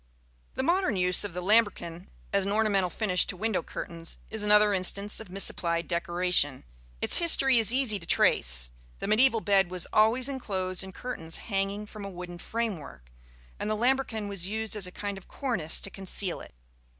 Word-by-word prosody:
The 260 - -2
modern 345 - +1
use 180 0 +4
of 205 - -4
the 180 - -4
lambrequin 195 -4 +1 0.3
as 200 -1 +2
an 200 - -2
ornamental 205 -4 +1
finish 185 -2 +1
to 185 - -3
window 220 0 -1
curtains 165 -1 -7
is 220 -1 -2
another 210 0 +4
instance 200 +2 0
of 220 -4 -10
misapplied 170 -3 +1
decoration. 175 -5 +1 0.4
Its - - +4
history 270 -7 +4
is 225 0 +4
easy 250 -5 +3
to 165 - -9
trace. - - +2 0.3
The - - -5
mediæval 225 +2 +3
bed 195 -3 +3
was 180 -1 0
always 225 +4 +3
enclosed 190 -9 -2
in 190 - -9
curtains 165 -8 -4
hanging 200 0 -3
from 210 0 -10
a 200 - -6
wooden 175 -1 -9
framework, 170 - -5 0.5
and - - -3
the 215 - -1
lambrequin 245 -3 0
was 195 -3 -2
used 220 +1 -2
as 200 -3 0
a - - -10
kind 200 +1 -5
of 190 - -22
cornice 230 - -1
to 195 - -5
conceal 190 -1 -3
it. - - -14
200 Hz, 180 wpm, -28 LUFS, 180-220 Hz, 0.5 s, use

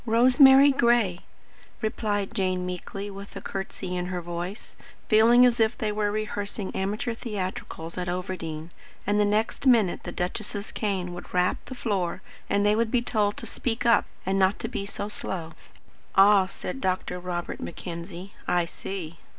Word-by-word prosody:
"Rosemary 265 +4 +7
Gray," 235 -8 +3 0.6
replied 215 -2 -1
Jane 185 -4 0
meekly, 195 +3 -5
with 200 +1 -10
a - - -4
curtsey 195 -1 -5
in 180 0 -2
her 180 -1 -3
voice; 175 +4 -6 0.3
feeling 235 +3 +7
as 240 -1 +3
if 225 +1 +2
they 215 -1 -1
were 210 0 0
rehearsing 205 -1 -3
amateur 210 +6 -1
theatricals 185 -6 -5
at 180 -1 -2
Overdene, 175 -3 -4 0.3
and 205 0 +2
the 210 - +4
next 215 +6 0
minute 225 -8 +4
the - - -6
duchess's 205 +3 -3
cane 190 -4 -2
would 175 - -9
rap 180 0 +3
the 260 - -7
floor 190 -7 -2 0.3
and 200 0 +2
they 210 0 +4
would 230 0 +1
be 245 0 +1
told 210 -3 +1
to - - -2
speak 240 0 -3
up 235 - +5 0.2
and 195 +1 +1
not 190 +1 +3
be 200 - -3
so 205 - -4
slow. 170 -5 -4 0.6
"Ah," 195 -1 +6
said 265 +7 -6
Dr. 185 -1 -1
Robert 175 -1 -4
Mackenzie, 175 +2 -7
"I 175 -1 +2
see." 170 -1 -6
200 Hz, 160 wpm, -26 LUFS, 180-220 Hz, 0.6 s, Rosemary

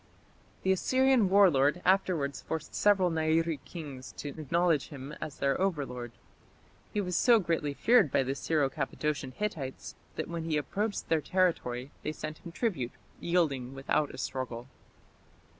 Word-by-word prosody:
The 190 - +3
Assyrian 255 +2 +3
war 195 -1 +7
lord 145 +4 +3
afterwards 180 -7 +2
forced 160 -1 -5
several 195 -4 +3
Nairi 160 0 +1
kings 140 -6 -8
to 145 - -6
acknowledge 160 +1 +1
him 140 -1 -8
as 155 -2 -5
their 140 +4 +1
overlord. 135 -10 -2 0.8
He 210 - -1
was 180 -3 -1
so 240 -2 +6
greatly 165 -7 -1
feared 235 - +5
by - - +3
the 130 +1 -1
Syro 145 +1 +1
Cappadocian 145 0 -2
Hittites 135 -4 -4 0.2
that - - -3
when 170 -1 -4
he 160 -2 0
approached 200 +8 -2
their 160 -2 +3
territory 145 -7 0
they 155 - -3
sent 155 0 -6
him 170 - -9
tribute, 170 - -2 0.3
yielding 140 -7 0
without 140 +2 0
a - - -10
struggle. 130 -2 -4
155 Hz, 150 wpm, -30 LUFS, 135-180 Hz, 0.8 s, war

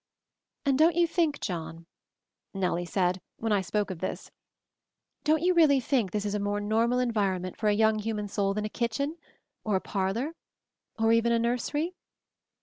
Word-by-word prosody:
"And 275 -1 +2
don't 325 +1 +5
you 345 0 +4
think, 325 -3 0
John," 165 -2 -5 0.7
Nellie 180 -2 -1
said, 180 0 0 0.2
when 225 -1 -2
I 205 -2 +3
spoke 205 +1 -1
of 180 - -6
this, 185 - -5 0.9
"don't 310 +1 +2
you 365 +1 +4
really 310 -5 +5
think 245 -5 +1
this 210 +1 -2
is 205 - -1
a 210 - 0
more 205 0 -1
normal 225 +4 +1
environment 200 -7 0
for 215 - -1
a - - +4
young 220 0 +3
human 210 -1 -3
soul 195 -1 0
than 210 0 -1
a - - -3
kitchen? 250 +8 -2 0.5
Or 210 -2 0
a - - +3
parlor? 200 - -2 0.6
Or 225 0 +3
even 230 +1 +3
a 235 - +4
nursery?" 250 +8 -1
220 Hz, 175 wpm, -28 LUFS, 195-260 Hz, 0.9 s, don't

